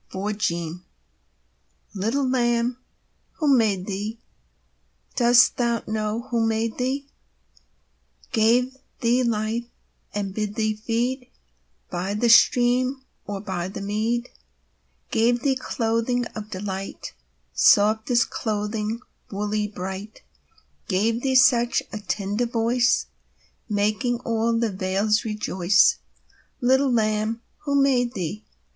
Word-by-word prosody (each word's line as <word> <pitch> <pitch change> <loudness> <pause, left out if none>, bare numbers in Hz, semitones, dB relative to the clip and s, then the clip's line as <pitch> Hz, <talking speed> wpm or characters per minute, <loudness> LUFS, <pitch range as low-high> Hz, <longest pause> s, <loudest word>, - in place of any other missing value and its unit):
THE - - -7
LAMB 180 -4 -2 1.1
Little 225 +8 0
Lamb, 240 -1 +1 0.5
who 295 -4 +3
made 205 -6 +1
thee 210 +3 -4 1.0
Dost 245 0 +5
thou 235 -2 0
know 215 +1 -2
who 230 -1 +2
made 225 +1 -1
thee, 265 +3 -1 1.3
Gave 245 +2 +2 0.3
thee 240 +2 +3
life, 230 0 -1 0.5
and 200 -2 -3
bid 210 0 -3
thee 215 -1 0
feed 245 +4 -2 0.6
By 190 +3 -2
the 235 +3 +1
stream 250 +3 +4 0.2
and 205 0 -6
o'er 180 -1 -3
the 195 - -7
mead; 220 +4 -1 0.8
Gave 240 +2 +2
thee 275 -2 +2
clothing 235 0 -1
of 215 -1 -6
delight, 195 0 -6 0.4
Softest 220 - +4
clothing, 215 +1 -2 0.3
woolly, 210 +1 -2
bright; 195 +1 -7 0.6
Gave 220 +5 +1
thee 265 0 0
such 250 -2 +4
a 215 - -4
tender 205 +3 -2
voice, 235 +1 +2 0.6
Making 215 +4 0
all 230 -1 0
the 230 -2 0
vales 195 +3 0
rejoice? 195 -4 +2 0.6
Little 265 +1 +3
Lamb, 220 0 0 0.2
who 280 -1 +2
made 250 -3 +2
thee? 195 +3 -4
225 Hz, 110 wpm, -24 LUFS, 210-245 Hz, 1.3 s, Dost